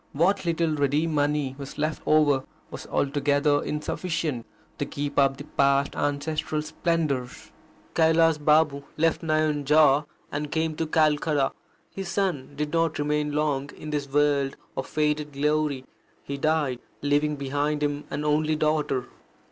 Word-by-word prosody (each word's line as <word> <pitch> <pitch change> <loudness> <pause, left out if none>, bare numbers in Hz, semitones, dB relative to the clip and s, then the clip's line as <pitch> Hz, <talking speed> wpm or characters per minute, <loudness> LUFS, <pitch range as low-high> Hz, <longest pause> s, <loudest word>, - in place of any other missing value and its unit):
What 180 +6 +2
little 165 -1 +1
ready 145 +1 +1
money 145 -3 0
was 140 -1 -8
left 155 +1 -1
over 145 -3 +4 0.3
was - - -8
altogether 145 +1 +1
insufficient 150 -4 -3 0.3
to - - 0
keep 145 0 -2
up 135 -1 +3
the - - -7
past 140 0 +1
ancestral 150 +1 -1
splendours. 155 -6 -2 0.4
Kailas 160 -1 +4
Babu 150 -2 +4 0.2
left 165 +1 +2
Nayanjore, 150 -2 +3 0.2
and 145 0 -3
came 160 -1 0
to 165 - -1
Calcutta. 150 -2 +2 0.4
His 195 -2 -5
son 185 -10 -1
did 150 +1 -3
not 165 -1 +1
remain 150 0 0
long 145 -2 0
in 155 - -7
this 145 -2 -2
world 145 -1 +2 0.2
of 135 - -3
faded 150 -1 -1
glory. 150 -1 0 0.4
He 140 - -5
died, 145 -3 0 0.2
leaving 145 +1 +2
behind 145 +2 -1
him 145 0 -1
an 150 +1 -3
only 155 +1 +2
daughter. 150 -4 0
150 Hz, 140 wpm, -26 LUFS, 140-155 Hz, 0.4 s, over